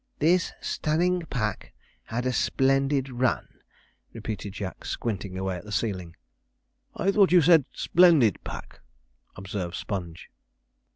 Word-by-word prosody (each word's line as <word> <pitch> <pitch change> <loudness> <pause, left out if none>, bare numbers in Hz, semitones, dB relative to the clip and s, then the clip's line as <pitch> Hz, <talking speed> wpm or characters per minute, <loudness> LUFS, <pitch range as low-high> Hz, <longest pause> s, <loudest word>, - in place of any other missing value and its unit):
'This 170 +4 +2
stunning 175 +4 0
pack 110 -6 -3 0.3
had 120 +3 -3
a 130 - 0
splendid 135 +1 +1
run,' 125 0 -1 0.5
repeated 105 -2 -5
Jack, 95 -2 -6
squinting 100 -4 -4
away 95 0 -2
at - - -10
the 105 - -10
ceiling. 95 -6 -2 0.8
'I 195 - +1
thought 200 -2 +4
you 180 - +7
said 160 -3 +5
splendid 160 - +4
pack,' - - -8 0.6
observed 95 -2 -5
Sponge. 85 -5 -6
120 Hz, 120 wpm, -26 LUFS, 95-155 Hz, 0.8 s, you